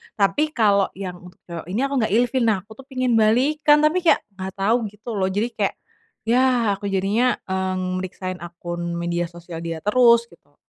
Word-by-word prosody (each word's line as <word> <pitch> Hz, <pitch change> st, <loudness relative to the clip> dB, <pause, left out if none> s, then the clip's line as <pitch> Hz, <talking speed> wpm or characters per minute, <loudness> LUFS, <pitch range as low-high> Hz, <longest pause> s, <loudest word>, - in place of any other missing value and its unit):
tapi 205 Hz, +9 st, +2 dB
kalau 200 Hz, -4 st, +3 dB
yang 180 Hz, -2 st, -6 dB
untuk 180 Hz, 0 st, -15 dB
cowok 170 Hz, -2 st, -8 dB
ini 190 Hz, +5 st, -2 dB
aku 275 Hz, 0 st, -1 dB
nggak 220 Hz, -2 st, 0 dB
ilfil. 245 Hz, +2 st, +2 dB
Nah 215 Hz, -3 st, +3 dB
aku 215 Hz, -, -23 dB
tuh 270 Hz, -, -11 dB
pengen 255 Hz, -2 st, 0 dB
balikan 295 Hz, +7 st, +3 dB
tapi 310 Hz, +4 st, +3 dB
kayak -, -, +4 dB
nggak 190 Hz, -1 st, -7 dB
tahu 205 Hz, +4 st, +2 dB
gitu 210 Hz, +3 st, -12 dB
loh 190 Hz, -1 st, +1 dB
jadi 205 Hz, +4 st, 0 dB
kayak, -, -, -1 dB, 0.5 s
ya 250 Hz, +2 st, +4 dB, 0.3 s
aku 200 Hz, -, -9 dB
jadinya, 200 Hz, +6 st, +1 dB
mmm, 185 Hz, -1 st, -2 dB
meriksain 185 Hz, 0 st, -5 dB
akun 175 Hz, 0 st, -5 dB
media 170 Hz, 0 st, -2 dB
sosial 170 Hz, 0 st, -9 dB
dia 165 Hz, -1 st, -4 dB
terus 235 Hz, +2 st, +5 dB
gitu. 145 Hz, -4 st, -23 dB
195 Hz, 185 wpm, -22 LUFS, 180-235 Hz, 0.5 s, terus